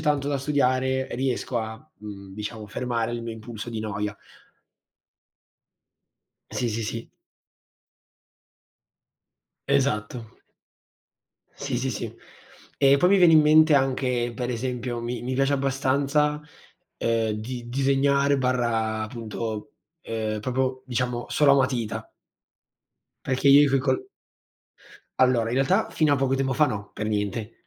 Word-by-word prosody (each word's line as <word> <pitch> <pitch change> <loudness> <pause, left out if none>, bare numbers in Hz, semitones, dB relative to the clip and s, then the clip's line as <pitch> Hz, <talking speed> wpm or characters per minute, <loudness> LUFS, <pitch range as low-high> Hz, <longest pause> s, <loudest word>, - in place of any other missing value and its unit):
tanto 145 -2 0
da 140 - 0
studiare, 130 -2 +1
riesco 130 -1 -1
a, 110 0 -4 0.2
mhmm, 100 -2 -10
diciamo, 105 +2 -6
fermare 120 +1 -2
il 120 0 -4
mio 115 - -4
impulso 110 +1 -8
di 110 - -4
noia. 105 -1 -3 2.3
Sì, 125 - -2
sì, 115 +1 -2
sì. 115 +2 -5 2.6
Esatto. 120 -4 -1 1.1
Sì, 140 -3 -3
sì, 130 +2 -1
sì. 110 - -5 0.6
E, 140 0 +6
poi, 180 +6 +3
mi 200 - +5
viene 175 -3 +6
in 155 - +8
mente 155 +1 +6
anche, 130 -3 +1
per 125 -1 -3
esempio, 125 0 -3
mi 120 +1 -4
mi 130 +1 -3
piace 135 +1 +2
abbastanza, 140 +2 +1 0.6
ehm, 115 -1 0
di 120 +3 -6
disegnare/ 130 -4 +1
appunto, 110 +2 -5 0.3
ehm, 110 -1 -3
proprio, 130 +3 -2
diciamo, 125 -1 -2
solo 145 -2 +4
a - - +6
matita 130 -5 -1 1.1
perché 130 +2 -1
io 145 +1 +7
coi 135 - +3
col 370 - -1 1.1
Allora, 125 -3 +3
in - - -1
realtà, 180 +11 +2
fino 155 -2 +2
a - - +3
poco 135 0 +1
tempo 135 0 0
fa, 150 +3 +4
no, 100 -5 -5
per 105 - -4
niente. 105 +1 -3
125 Hz, 125 wpm, -25 LUFS, 115-140 Hz, 2.6 s, in